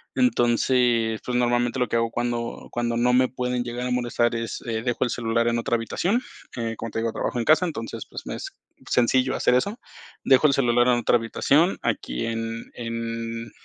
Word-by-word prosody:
Entonces, 120 Hz, -, +2 dB
pues, 125 Hz, -, -2 dB
normalmente 120 Hz, +1 st, +1 dB
lo 125 Hz, -, +1 dB
que -, -, -2 dB
hago 115 Hz, 0 st, +1 dB
cuando 120 Hz, 0 st, -3 dB
cuando 120 Hz, -1 st, -1 dB
no 125 Hz, +1 st, +3 dB
me 130 Hz, +1 st, +4 dB
pueden 125 Hz, 0 st, -2 dB
llegar 120 Hz, +1 st, -4 dB
a 125 Hz, -, -2 dB
molestar 120 Hz, -1 st, +1 dB
es, 115 Hz, 0 st, -4 dB
eh, 115 Hz, -2 st, -2 dB
dejo 120 Hz, -1 st, 0 dB
el -, -, 0 dB
celular 115 Hz, -1 st, 0 dB
en 120 Hz, 0 st, +1 dB
otra 120 Hz, -, 0 dB
habitación, 175 Hz, -, 0 dB, 0.4 s
eh, 115 Hz, -1 st, -2 dB
como 115 Hz, -, -5 dB
te -, -, -2 dB
digo, 115 Hz, 0 st, -1 dB
trabajo 120 Hz, -, -3 dB
en 115 Hz, -, -1 dB
casa, 155 Hz, +3 st, +5 dB
entonces, 140 Hz, -10 st, -5 dB
pues, -, -, -7 dB
me -, -, -4 dB
es -, -, -7 dB, 0.3 s
sencillo 130 Hz, +2 st, +2 dB
hacer 125 Hz, -, +3 dB
eso. 200 Hz, -, 0 dB, 0.5 s
Dejo 135 Hz, +3 st, +5 dB
el 140 Hz, -, +2 dB
celular 120 Hz, -2 st, +3 dB
en 125 Hz, -1 st, +4 dB
otra 120 Hz, +1 st, +3 dB
habitación, 140 Hz, +9 st, +2 dB
aquí -, -, -2 dB
en 115 Hz, 0 st, -4 dB
en 115 Hz, -1 st, -4 dB
120 Hz, 200 wpm, -24 LUFS, 115-125 Hz, 0.5 s, casa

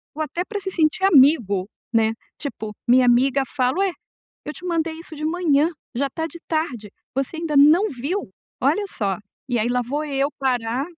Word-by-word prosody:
Ou 315 Hz, -, -4 dB
até 340 Hz, +3 st, -2 dB
pra 415 Hz, -1 st, -4 dB
se 385 Hz, -1 st, -5 dB
sentir 320 Hz, +1 st, +1 dB
amigo, 260 Hz, -, +5 dB, 0.3 s
né, 225 Hz, -1 st, +3 dB, 0.3 s
tipo, 220 Hz, -7 st, -5 dB, 0.2 s
minha 250 Hz, +1 st, +6 dB
amiga 260 Hz, +3 st, +4 dB
fala: 255 Hz, +5 st, +1 dB
"Ué, 390 Hz, -1 st, +2 dB, 0.5 s
eu 300 Hz, -, -5 dB
te 360 Hz, -, -7 dB
mandei 330 Hz, -2 st, 0 dB
isso 325 Hz, 0 st, -9 dB
de 305 Hz, 0 st, -6 dB
manhã, 315 Hz, -2 st, +2 dB, 0.3 s
já 275 Hz, +4 st, 0 dB
tá 320 Hz, +4 st, -3 dB
de 340 Hz, +1 st, -10 dB
tarde, 280 Hz, -, -2 dB, 0.2 s
você 270 Hz, +4 st, -2 dB
ainda 320 Hz, -3 st, -2 dB
não 315 Hz, +9 st, +6 dB
viu?". 290 Hz, +10 st, -3 dB, 0.3 s
Olha 415 Hz, -, +2 dB
só, 200 Hz, -, -2 dB, 0.3 s
e 245 Hz, -2 st, +1 dB
aí, 230 Hz, +2 st, +1 dB
lá 250 Hz, 0 st, +1 dB
vou 290 Hz, +5 st, -2 dB
eu 280 Hz, -1 st, 0 dB
parar 250 Hz, -1 st, 0 dB
285 Hz, 185 wpm, -22 LUFS, 250-330 Hz, 0.5 s, minha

